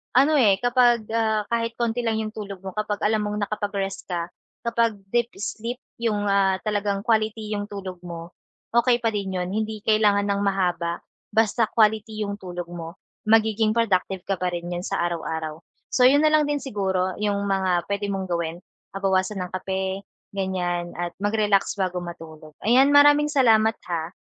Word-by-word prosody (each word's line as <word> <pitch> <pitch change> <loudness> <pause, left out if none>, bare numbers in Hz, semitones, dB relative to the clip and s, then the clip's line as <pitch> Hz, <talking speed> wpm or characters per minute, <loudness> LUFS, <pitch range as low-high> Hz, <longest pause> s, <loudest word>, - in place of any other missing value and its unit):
ano, 275 +5 +5
eh, 200 -6 +4
kapag, 245 -2 +3
ah, 220 -2 +1
kahit 230 0 -1
konti 235 0 0
lang 225 -1 0
yung 215 -1 -3
tulog 200 -3 -6
mo 190 - -5
kapag 210 -1 -2
alam 215 0 +2
mong 210 0 -2
nakapag-rest 200 -2 -3
ka, 170 -2 -2 0.4
kapag 230 -1 +1 0.2
deep 235 -1 +1
sleep 230 +4 -4 0.2
yung, 215 -3 0
ah, 195 -1 +3
talagang 205 -2 -1
quality 220 -1 0
yung 205 0 -3
tulog 190 -3 -7
mo, 170 -1 -8 0.4
okey 240 0 +4
pa 225 - +2
din 195 -2 -3
yun. 180 0 -2
Hindi 215 +1 -3
kailangan 210 -2 +3
ng 200 0 +1
mahaba, 175 -3 0 0.3
basta 225 +1 +2
quality 215 0 +1
yung 200 0 -4
tulog 180 -2 -6
mo. 170 0 -7 0.3
Magiging 220 0 +3
productive 190 -5 +1
ka 195 -2 -2
pa 180 - 0
rin 170 0 -4
niyan 175 +1 -4
sa - - -1
araw-araw. 160 -2 -3 0.3
So 250 - +4
yun 285 +3 +5
na 310 - +5
lang 305 -1 +4
din 290 -1 -1
siguro, 190 -6 -1
yung 205 -1 0
mga 185 -3 +1
puwede 200 0 -1
mong 190 -1 -3
gawin. 170 -1 -2 0.4
Ah, 195 - -4
bawasan 190 0 +1
ang 180 - -5
kape, 190 +1 -3 0.3
ganyan 180 -3 -2
at 175 0 -3
mag-relax 205 -1 +2
bago 185 -2 -1
matulog. 160 -3 -10
Ayan, 260 +6 +5
maraming 290 +1 +7
salamat 225 -5 +4 0.2
ha, 170 0 -3
205 Hz, 175 wpm, -24 LUFS, 185-225 Hz, 0.4 s, maraming